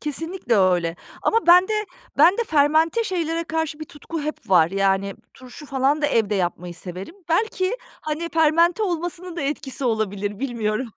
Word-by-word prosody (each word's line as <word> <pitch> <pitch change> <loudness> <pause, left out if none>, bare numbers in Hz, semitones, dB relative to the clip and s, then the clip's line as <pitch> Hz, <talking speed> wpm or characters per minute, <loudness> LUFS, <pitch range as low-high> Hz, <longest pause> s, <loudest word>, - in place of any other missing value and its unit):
Kesinlikle 310 - -2
öyle. 175 -3 +2 0.3
Ama 455 -4 +1
bende 360 +4 +6 0.5
bende 400 +6 +5
fermente 315 +7 +2
şeylere 335 -4 -2
karşı 320 -1 -3
bir - - -4
tutku 310 +2 -7
hep 290 -7 -6
var. 170 -2 +5
Yani, 195 0 0 0.2
turşu 255 +3 -12
falan 275 +2 +1
da - - +4
evde 220 -6 +1
yapmayı 175 -1 -2
severim. 185 - -8
Belki, 375 +4 0 0.2
hani, 310 +2 -3
fermente 335 +5 +3
olmasının 350 -1 -3
da 335 - -3
etkisi 275 -2 -3
olabilir, 205 -3 -1
bilmiyorum. 235 -2 -2
295 Hz, 150 wpm, -22 LUFS, 210-335 Hz, 0.5 s, bende